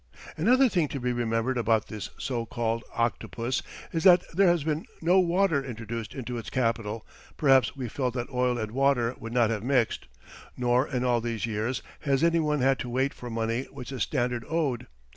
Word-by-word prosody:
Another 255 +10 +4
thing 175 -9 +1
to 140 - -5
be 125 0 -1
remembered 120 +1 0
about 115 -2 +2
this 105 -2 -6
so 120 -3 -2
called 115 -1 -2
"octopus" 120 +1 -1 0.3
is 165 - -1
that 180 -2 +7
there 195 +3 +4
has 175 -3 +3
been 155 +1 -2
no 175 +3 +4
"water" 175 -4 +2
introduced 115 -3 -6
into 125 -2 -4
its 115 - -7
capital 115 -3 -1 0.3
(perhaps 135 -3 +4
we 130 -3 -4
felt 125 +1 -2
that 120 +1 -3
oil 125 -1 +1
and 110 -2 -3
water 130 -2 +2
would 115 - -7
not 120 -2 +3
have 110 -3 -2
mixed); 125 -1 0 0.5
nor 125 +2 +2
in 125 -3 -2
all 120 -2 +2
these 115 -2 -2
years 115 +3 -2 0.2
has 140 -1 +1
any 170 0 +4
one 150 -3 +1
had 135 +1 +3
to 125 - -4
wait 130 +3 0
for 120 - -8
money 115 +2 -1
which 135 -1 -9
the 130 - -5
Standard 120 -1 -1
owed. 140 -7 -1
125 Hz, 195 wpm, -27 LUFS, 115-140 Hz, 0.5 s, that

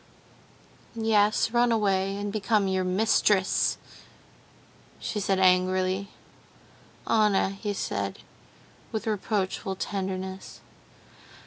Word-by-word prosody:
"Yes, 220 -1 +2
run 240 0 +3
away, 195 -3 +1
and 205 0 -4
become 215 -1 +1
your 190 -1 0
mistress," 190 0 +2 1.2
she 210 - -3
said 195 -1 0
angrily. 185 +1 +2 1.0
"Anna," 210 -4 +3
he 205 +1 -4
said, - - -3 0.7
with 220 0 -3
reproachful 200 -2 -2
tenderness. 190 -1 -5
195 Hz, 85 wpm, -27 LUFS, 190-215 Hz, 1.2 s, run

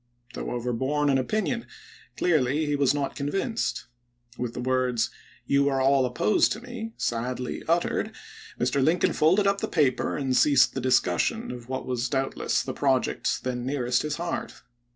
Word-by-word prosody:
Though - - -5
overborne 130 +5 0
in 135 - +3
opinion, 215 - -1 0.5
clearly 155 -3 +2
he 145 -1 0
was 140 -2 +3
not 145 -1 -2
convinced. 195 - -2 0.5
With 125 -2 -4
the - - -4
words, 125 -2 0 0.2
" - - -27
You 140 0 +4
are 135 -1 0
all 135 -1 +3
opposed 115 -4 +2
to 215 - -7
me," 235 -2 -7
sadly 125 +2 -2
uttered, 170 +1 +1 0.5
Mr. 130 +2 +1
Lincoln 165 +5 +2
folded 185 +7 +3
up 200 0 +2
the - - -1
paper 145 -6 +1
and 135 -3 0
ceased 140 -2 +5
the 135 - -3
discussion 130 - +1
of 120 -1 -9
what 130 0 -3
was 125 -1 -2
doubtless 135 0 0
the - - -4
project - - 0
then 125 -1 -3
nearest 125 -2 0
his 150 -1 -2
heart. 170 0 -5
135 Hz, 165 wpm, -26 LUFS, 125-160 Hz, 0.5 s, ceased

